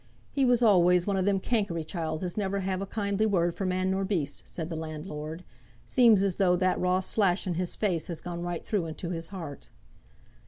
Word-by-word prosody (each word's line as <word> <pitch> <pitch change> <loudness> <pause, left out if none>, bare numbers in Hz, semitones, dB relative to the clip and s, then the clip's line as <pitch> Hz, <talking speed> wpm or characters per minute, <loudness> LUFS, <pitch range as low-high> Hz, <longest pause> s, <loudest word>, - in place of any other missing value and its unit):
"He 275 -2 +2
was 245 -1 +3
always 180 -4 +5
one 200 - 0
of 190 -1 +1
them 200 -1 +2
cankery 200 -7 -1
chiels 160 0 -3
as 180 -1 -3
never 200 -1 -1
have 190 0 -2
a 195 - -4
kindly 205 0 0
word 175 -4 +2
for 195 - -3
man 185 +1 0
nor 190 +1 0
beast," 175 -8 -2
said 165 0 -5
the - - -2
landlord. 155 +1 -6 0.4
"Seems 230 -6 +5
as 195 -3 0
though 180 -3 +4
that 185 0 +1
raw 180 +1 +2
slash 190 -1 +1
in 180 - -1
his 175 +1 -2
face 180 -7 -1
had 170 -3 -5
gone 175 -1 -5
right 175 -1 -4
through 195 -6 -1
into 170 +2 -5
his 165 -1 -4
heart." 165 -7 -8
185 Hz, 210 wpm, -28 LUFS, 170-200 Hz, 0.4 s, always